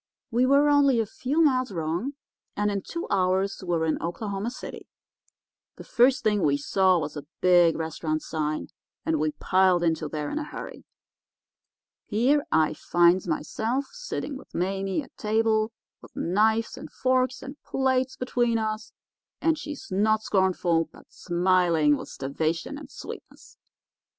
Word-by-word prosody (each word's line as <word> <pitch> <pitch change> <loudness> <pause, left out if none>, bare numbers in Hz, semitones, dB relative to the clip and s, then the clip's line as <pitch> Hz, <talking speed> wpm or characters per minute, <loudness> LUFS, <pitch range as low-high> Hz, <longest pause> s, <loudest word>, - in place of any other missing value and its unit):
We 245 +2 +3
were 280 +2 +5
only 285 -4 +4
a 225 - +1
few 270 +9 0
miles 255 -5 +2
wrong, 170 - -2 0.4
and 205 0 +1
in 200 -1 -2
two 335 - -5
hours 190 0 +1
we 185 - -9
were 160 - 0
in 160 - -1
Oklahoma 200 +5 -3
City. 255 - -9 0.9
The - - -10
first 250 +2 +3
thing 210 -2 +2
we 145 -3 +3
saw 185 +5 +3
was 155 -2 -3
a 145 -1 -7
big 175 -2 +5
restaurant 155 -1 -3
sign, 155 -1 -3 0.4
and 160 -1 +1
we 155 0 0
piled 185 +2 +3
into 160 -2 0
there 150 -1 -4
in 305 - -2
a - - -3
hurry. - - -8 1.2
Here 255 +7 +2
I 155 -1 +3
finds 175 +3 +3
myself 225 - -1
sitting 485 - -5
with - - -15
Mame 195 - -1
at - - -18
table, 220 0 +1 0.3
with - - -16
knives 220 +5 +1
and - - -10
forks 255 0 0
and 275 +2 -9
plates 260 -1 0
between 240 -2 +1
us, 215 0 -3 0.5
and 325 -1 +2
she 300 -1 -6
not 215 +3 +2
scornful, 180 -5 +1
but - - -18
smiling 175 -4 +2
with - - -7
starvation 155 - -2
and 300 - -11
sweetness. - - -11
200 Hz, 150 wpm, -26 LUFS, 170-255 Hz, 1.2 s, were